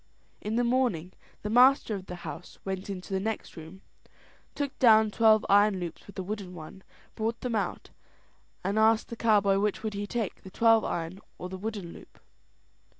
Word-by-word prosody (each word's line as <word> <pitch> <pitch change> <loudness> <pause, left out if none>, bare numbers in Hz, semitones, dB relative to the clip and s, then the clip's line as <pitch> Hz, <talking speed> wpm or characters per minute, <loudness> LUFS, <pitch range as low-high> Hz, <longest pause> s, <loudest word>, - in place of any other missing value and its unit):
In 210 +2 -3
the 240 - +2
morning 235 -9 0 0.3
the 210 - -3
master 250 -1 +5
of 190 -2 -6
the 180 - -6
house 155 +3 -8
went 190 0 -4
into 195 0 -6
the 190 - +1
next 220 +3 -4
room, 165 +4 -11 0.7
took 285 -2 -4
down 220 -3 +6
the - - -14
twelve 220 -1 +5
iron 205 -1 +4
loops 175 -2 -7
with 200 - -13
a 190 - -3
wooden 195 -2 -6
one, 160 +3 -10 0.3
brought 225 +1 -3
them 250 -2 -3
out, 210 -3 -3 0.7
and 200 +3 0
asked 220 0 +3
the 235 - -5
cowboy 205 -4 +3
which 210 +1 -1
would 215 -1 -2
he 205 0 -4
take, 225 -2 -3
the 190 - -11
twelve 225 +2 +4
iron 170 +2 -3 0.2
or 180 - -6
the 190 - -6
one - - -14
wooden 205 -5 -5
loop. - - -15
205 Hz, 195 wpm, -28 LUFS, 190-225 Hz, 0.7 s, down